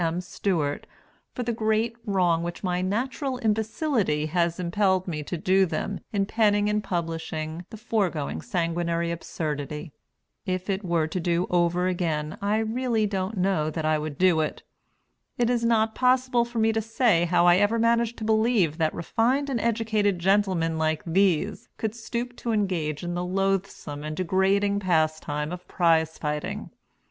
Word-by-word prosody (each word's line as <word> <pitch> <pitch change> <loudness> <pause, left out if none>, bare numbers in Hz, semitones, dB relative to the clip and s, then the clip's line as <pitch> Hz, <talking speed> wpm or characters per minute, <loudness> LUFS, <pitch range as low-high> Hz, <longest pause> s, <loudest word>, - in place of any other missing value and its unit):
M. 165 +1 0
Stewart, 170 -4 -2 0.5
for 250 - -2
the 235 0 -1
great 220 +1 0
wrong 180 -4 +2
which 170 +3 -5
my 180 -1 0
natural 255 +7 -2
imbecility 220 - 0
has 170 +1 0
impelled 185 +1 +1
me 155 -4 -3
to 170 +4 -4
do 190 +3 +3
them 165 +5 -3
in 200 -2 +1
penning 205 -1 +2
and 210 0 0
publishing 165 -2 -4
the 220 - -9
foregoing 190 - -1
sanguinary 170 - -1
absurdity. 150 -2 -4 0.5
If 185 +1 -2
it 195 +2 -2
were 170 -3 +1
to 160 +4 -3
do 175 +1 +1
over 175 +1 +2
again, 160 -4 -1
I 205 +2 +1
don't 220 0 -1
really 240 -3 +1 0.3
know 180 -5 +1
that 155 0 -3
I 155 0 +2
would 150 -2 -5
do 180 -3 +4
it. 155 - -2 0.7
It 240 0 +2
is 240 -1 0
not 225 -1 +2
possible 255 -1 +2
for 235 0 -8
me 225 0 +3
to 220 - 0
say 225 -5 +2
how 175 0 +3
I 175 0 +6
ever 205 +3 +2
managed 230 0 +2
to - - -6
believe 220 -7 +2
that 160 -1 +1
refined 255 - 0
and 240 - 0
educated 220 -4 +1
gentlemen 180 -3 +1
like 155 -1 0
these 190 +2 +1
could 220 -1 -2
stoop 235 +1 -4
to 235 - -3
engage 175 -8 -1
in 175 0 -3
the 175 0 -2
loathsome 190 -5 -2
and 155 0 -5
degrading 195 +2 +2
pastime 155 -4 0
of 180 0 -7
prize 160 -2 +2
fighting. 150 -1 -4
185 Hz, 165 wpm, -26 LUFS, 165-220 Hz, 0.7 s, I